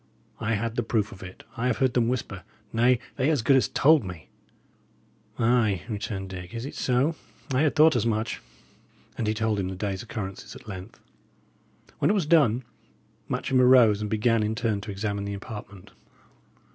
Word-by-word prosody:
I 115 0 0
had 115 +2 -3
the - - +3
proof 110 -2 -1
of 95 - -12
it; 90 -1 -10
I 125 +1 -1
have 125 - +1
heard 130 -2 +2
them 120 -2 +2
whisper; 115 -6 -3 0.3
nay, 120 +2 +4 0.2
they 135 +2 +2
as 145 -7 +1
good 135 +3 +5
as 130 - +3
told 155 -2 +4
me." 90 -6 -9 1.1
"Ay," 115 -5 +2
returned 100 -3 -4
Dick, 90 +1 -8
"is 115 +2 -4
it 140 - -6
so? 135 +6 +1 0.4
I 130 - +3
had 155 -2 +2
thought 155 -1 +6
as 120 - +2
much." 110 -1 -1 0.7
And 110 - -2
he 110 - +1
told 110 -1 0
him 95 - -1
the 95 - -5
day's 95 0 -3
occurrences 100 -5 -7
at - - -13
length. 95 +1 -8 1.0
When - - +2
it 205 - +3
was 190 -6 +1
done, 140 -7 +4 0.7
Matcham 130 -1 +1
arose 125 -5 +6
and 105 - -3
began, 110 +1 +2
in 105 +1 -1
turn, 110 -4 -1
to 105 0 -6
examine 100 0 -3
the 100 0 -3
apartment. 100 -2 -9
115 Hz, 185 wpm, -26 LUFS, 100-125 Hz, 1.1 s, thought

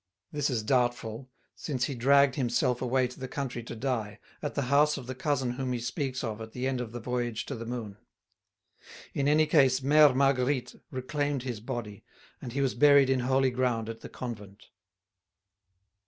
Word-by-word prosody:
This 145 -1 0
is 120 -5 -1
doubtful, 120 0 0 0.3
since 130 -5 -3
he 140 - -1
dragged 140 +2 +4
himself 125 -1 0
away 130 0 +1
to 125 - -13
the 130 - -5
country 125 -2 -4
to 115 0 -8
die, 110 -4 -2 0.2
at 145 - -4
the 140 - 0
house 145 +4 +3
of 130 - -7
the 130 - -5
cousin 130 -2 -1
whom 130 0 -3
he 120 - -2
speaks 130 +2 -3
of 110 -1 -4
at 110 0 -8
the 125 +1 -3
end 130 -2 -1
of 115 -3 -6
the 120 - -6
Voyage 120 -1 -2
to - - -5
the 115 -2 -6
Moon. 115 -5 -5 1.2
In 140 0 0
any 155 +2 +4
case, 135 -4 +4
Mère 145 0 +6
Marguerite 135 -1 +1 0.2
reclaimed 140 +1 -2
his 125 -5 -4
body, 110 -2 -6 0.4
and 120 - -7
he 140 - 0
was 135 -2 +1
buried 140 0 +6
in 130 - +2
holy 130 +1 +2
ground 120 -3 -1
at 115 0 -6
the - - -10
convent. 105 -5 -8
125 Hz, 185 wpm, -29 LUFS, 120-140 Hz, 1.2 s, Mère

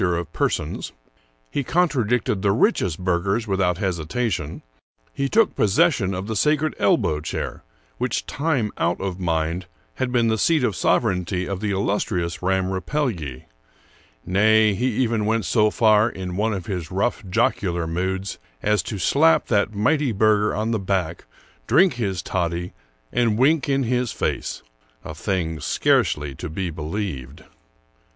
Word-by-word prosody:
He - - +2
was 90 -2 +2
no - - 0
respecter - - 0
of 80 -1 -12
per - - +2
sons; - - -4 0.6
he 140 - -1
contradicted 125 - +1
the 100 -1 +2
richest 100 - +2
burghers 95 +5 0
without 95 -4 +1
hesita 95 +5 -1
tion; 80 -4 -4 0.5
he 140 0 -1
took 225 +3 +3
possession 105 - +2
of 95 +1 -4
the 110 +1 -3
sacred 150 +4 +2
elbow 75 -1 +2
chair, 75 - -4 0.4
which - - -1
time 140 -8 -1
out - - +1
of 95 -1 -4
mind 85 0 -1 0.3
had 130 -1 -1
been 120 -2 +2
the 110 -1 +1
seat 160 +1 +3
of 110 -6 +1
sovereignty 90 -5 +1
of 100 -2 -3
the 105 0 -2
illustrious 95 -3 -1
Ramm 95 0 0
Rapelye. 95 - -2 0.8
Nay, 110 +3 +4
he 120 +6 0
even 115 -3 0
went 110 0 +1
so 110 -2 +3
far, 110 0 +4
in 95 -4 -6
one 110 +3 0
of 95 -4 -4
his 90 -5 -4
rough, 100 +5 -1
jocular 85 -2 0
moods, 95 +4 -3 0.2
as 105 -2 +2
to 100 +5 -5
slap 155 - +3
that 100 -1 +1
mighty 145 +5 +2
burgher 105 0 +2
on 110 +2 -1
the 110 - 0
back, 95 -4 -2 0.4
drink 185 -2 +5
his 100 -8 -2
toddy, 85 +1 -2 0.4
and 115 -3 +2
wink 145 +4 +3
in 135 0 +2
his 125 0 0
face, - - -3 0.2
— - - -37
a 80 - -6
thing 80 -1 -2
scarcely 75 -2 +1
to 65 - -7
be 90 +2 -3
believed. 80 -3 -5
100 Hz, 160 wpm, -23 LUFS, 90-115 Hz, 0.8 s, drink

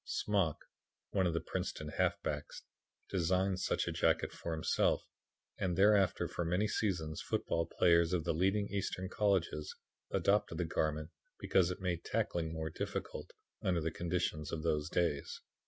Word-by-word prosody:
Smock, 95 -7 0 0.5
one 95 -2 +2
of 85 - 0
the - - +2
Princeton 75 -1 -4
halfbacks, 75 0 -1 0.4
designed 95 +1 +1
such - - 0
a - - 0
jacket - - +2
for 85 - -5
himself 80 -1 +1 0.6
and 90 -2 0
thereafter 100 -2 +4
for 85 - -3
many 90 +6 +1
seasons 85 -8 -1
football 85 0 -1
players 85 -1 +4
of 90 -3 +1
the 85 - 0
leading 95 +5 +2
Eastern 95 -2 -2
colleges 95 -8 0 0.3
adopted 100 -5 +2
the 90 - 0
garment 75 -1 -1 0.3
because 90 -2 +3
it 90 - -5
made 90 -3 -1
tackling 80 -2 -1
more 80 -1 -3
difficult - - -4 0.3
under 90 -2 +1
the 80 0 -1
conditions 85 -3 -2
of 80 -1 -3
those 75 -2 0
days. 85 -5 0
85 Hz, 150 wpm, -34 LUFS, 80-95 Hz, 0.6 s, thereafter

